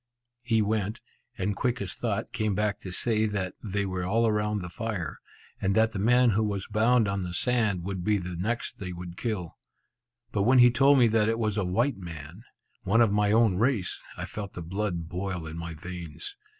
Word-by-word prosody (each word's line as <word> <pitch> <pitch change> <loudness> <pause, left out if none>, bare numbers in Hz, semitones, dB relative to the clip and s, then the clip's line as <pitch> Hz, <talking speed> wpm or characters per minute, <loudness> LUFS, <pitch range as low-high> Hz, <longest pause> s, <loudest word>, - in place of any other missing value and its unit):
He 115 -3 +2
went, 105 +1 -1 0.4
and 100 +2 -1
quick 125 +2 0
as 100 -2 -4
thought, - - -3
came 110 -2 0
back 105 0 0
to 95 - -8
say 110 +3 +1
that 95 -3 -2
they 100 -1 -1
were 95 -1 -3
all 110 +5 +2
round 105 -1 0
the 90 - -6
fire, 110 -7 -4 0.4
and 95 +1 +1
that 110 0 +4
the 105 - -4
man 120 +3 +4
who 110 +2 +2
was 100 -2 -2
bound 110 +1 +3
on 100 0 -1
the 90 -1 -4
sand 110 -6 +1
would 95 -1 -4
be 105 +2 +2
the 90 -1 -5
next 110 +7 -3
they 90 -2 -5
would 90 0 -8
kill. 95 -7 -4 0.7
But 100 - 0
when 125 +6 +5
he 120 -1 +8
told 140 +3 +5
me 125 - +6
that 110 0 +3
it 115 - +1
was 110 -3 0
a 105 - 0
white 95 +8 +1
man, 85 +2 -9 0.4
one 110 +5 +3
of 115 -3 +4
my 105 0 +2
own 110 -4 +4
race, 115 -6 +1 0.2
I - - -4
felt 100 -2 -6
the 85 - -6
blood 90 -2 -2
boil 90 -1 -4
in 80 +1 -7
my 85 -1 -5
veins. 85 - -7
105 Hz, 210 wpm, -28 LUFS, 90-110 Hz, 0.7 s, he